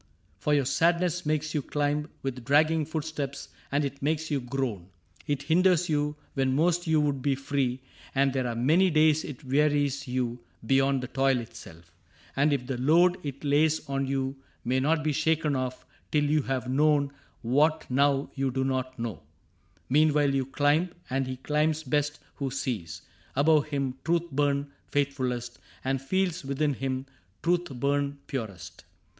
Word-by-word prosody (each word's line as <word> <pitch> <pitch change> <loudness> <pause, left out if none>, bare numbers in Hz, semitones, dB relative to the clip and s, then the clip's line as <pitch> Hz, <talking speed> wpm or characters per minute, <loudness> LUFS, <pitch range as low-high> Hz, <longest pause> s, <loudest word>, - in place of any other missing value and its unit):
For 150 +6 +2
your 140 -2 +2
sadness 170 +3 +1
makes 155 0 0
you 150 - 0
climb 145 +2 -1
With 130 -2 -4
dragging 155 +4 +3
footsteps, 150 -3 -4 0.2
and 145 +1 +1
it 140 0 -6
makes 155 +2 -1
you 145 - +1
groan; 120 -8 -3 0.4
It 145 -1 -1
hinders 175 +3 +3
you 150 -1 0 0.2
when 135 -1 +1
most 175 +3 +2
you 160 -1 +4
would 145 -3 0
be 140 0 +1
free. 135 -2 -1 0.3
And 135 0 +3
there 130 -2 0
are 120 - -3
many 160 +11 +4
days 155 -1 +4
it 145 0 -8
wearies 140 0 +1
you 125 -1 -2 0.3
Beyond 135 +1 +2
the - - -3
toil 135 0 +2
itself. 85 -8 -11 0.4
And 145 +2 +3
if 135 -3 0
the 130 -1 -3
load 170 +7 +4
It 140 -1 -6
lays 150 +2 +2
on 135 0 -1
you 135 0 -2 0.3
may 130 +2 +2
not 155 +3 +1
be 155 - +1
shaken 155 0 +1
oS 130 -1 -1 0.4
Till 150 -1 +3
you 150 +1 +2
have 130 -2 -2
known 145 +1 +3 0.3
what 150 +7 +2
now 140 +1 +2
you 135 -1 0
do 130 +1 -1
not 130 0 -2
know 115 - -4 0.3
— 95 +1 -37
Meanwhile 145 0 +3
you 135 -2 0
climb; 145 +6 +2 0.2
and 135 0 0
he 130 0 -4
climbs 150 +3 0
best 145 -1 0 0.2
who 140 -2 -2
sees 120 - -4 0.3
Above 150 +2 +4
him 135 -3 -2
truth 170 0 0
burn 140 0 0 0.2
faithfulest, 130 -4 -1 0.3
and 135 0 0
feels 180 +3 0
Within 140 +2 0
him 130 0 -3 0.4
truth 175 +1 +2
burn 140 +2 -1
purest. 110 - -6
140 Hz, 165 wpm, -28 LUFS, 130-155 Hz, 0.4 s, you